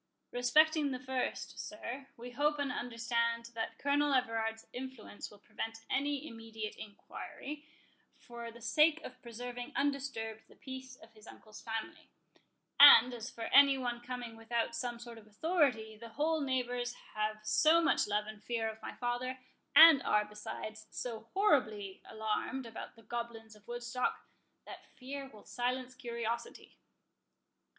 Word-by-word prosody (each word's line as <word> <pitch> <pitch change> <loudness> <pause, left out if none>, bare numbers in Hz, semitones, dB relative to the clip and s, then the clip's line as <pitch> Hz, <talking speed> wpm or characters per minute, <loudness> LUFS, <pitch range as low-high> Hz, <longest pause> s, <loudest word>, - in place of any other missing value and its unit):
"Respecting 300 +5 +4
the 255 -2 -3
first, 255 0 -3
sir, 275 -4 -6
we 245 +1 -8
hope 295 +4 +1
and 285 -2 -1
understand 235 -1 -1
that 225 -1 -4
Colonel 285 0 +2
Everard's 225 -3 0
influence 250 -4 -7
will 205 - -15
prevent 225 +2 -6
any 285 +2 0
immediate 225 -2 -7
enquiry, 290 +7 -8 0.5
for 235 -1 -8
the 235 +1 -14
sake 300 +7 +4
of 255 0 -10
preserving 245 +1 -6
undisturbed 270 -6 -2
the - - -19
peace 260 -1 -8
of 225 -2 -18
his 215 0 -16
uncle's 215 -1 -12
family; 225 -1 -5 0.7
and 255 -4 +10
as 235 0 -6
for 230 - -7
any 275 0 +8
one 240 -2 -3
coming 245 -2 -6
without 230 +5 -2
some 245 -6 -3
sort 235 -1 -10
of 215 - -18
authority, 225 - +1
the 230 +1 -10
whole 310 +6 0
neighbours 245 -2 -1 0.2
have 215 0 -2
so 315 +9 +5
much 330 - +2
love 210 0 0
and 215 0 -10
fear 230 -2 -1
of 220 0 -6
my - - -7
father, 245 +2 -2 0.4
and 320 -4 +10
are, 210 -4 +2
besides, 215 +1 -7
so 230 -1 -6
horribly 215 - +2
alarmed 220 +4 -2
about 225 -1 -8
the 225 - -17
goblins 225 -1 -6
of 210 -1 -21
Woodstock, 240 +1 -2 0.4
that - - -11
fear 270 +1 -7
will 210 -2 -15
silence 255 +1 -2
curiosity." 235 -2 -5
240 Hz, 145 wpm, -34 LUFS, 225-265 Hz, 0.7 s, and